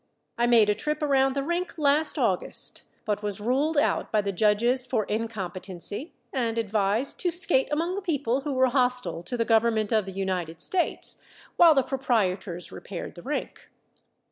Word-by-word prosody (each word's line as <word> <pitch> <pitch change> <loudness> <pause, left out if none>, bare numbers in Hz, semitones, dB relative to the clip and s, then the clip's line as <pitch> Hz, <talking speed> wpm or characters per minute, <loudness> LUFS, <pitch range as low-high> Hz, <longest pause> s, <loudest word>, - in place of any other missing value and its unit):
I 240 0 +1
made 230 -3 +5
a 210 - +3
trip 300 +9 -3
around 270 -2 +2
the 275 - -1
rink 345 +4 -3
last 300 +1 +2
August, - - +1 0.2
but 210 -1 -1
was 205 -1 -3
ruled 270 +8 0
out 290 - +1
by 215 - +2
the 200 0 -2
judges 220 +6 +2
for 250 -4 -1
incompetency, 205 - -5 0.2
and 235 -3 -1
advised 215 +3 0
to 360 - +1
skate 335 -6 +1
among 330 +4 -1
the 400 - -3
people 275 - -1
who 285 0 -3
were 260 0 +4
hostile 250 -7 +1
to 180 +8 -4
the 230 - 0
government 225 -2 +2
of 215 -3 +1
the - - -5
United 180 -4 -3
States, 360 -3 0 0.3
while 335 -3 +7
the 270 - +3
proprietors 205 -9 -2
repaired 185 -4 -7
the 175 - -11
rink. 295 +8 -5
235 Hz, 170 wpm, -26 LUFS, 205-280 Hz, 0.3 s, while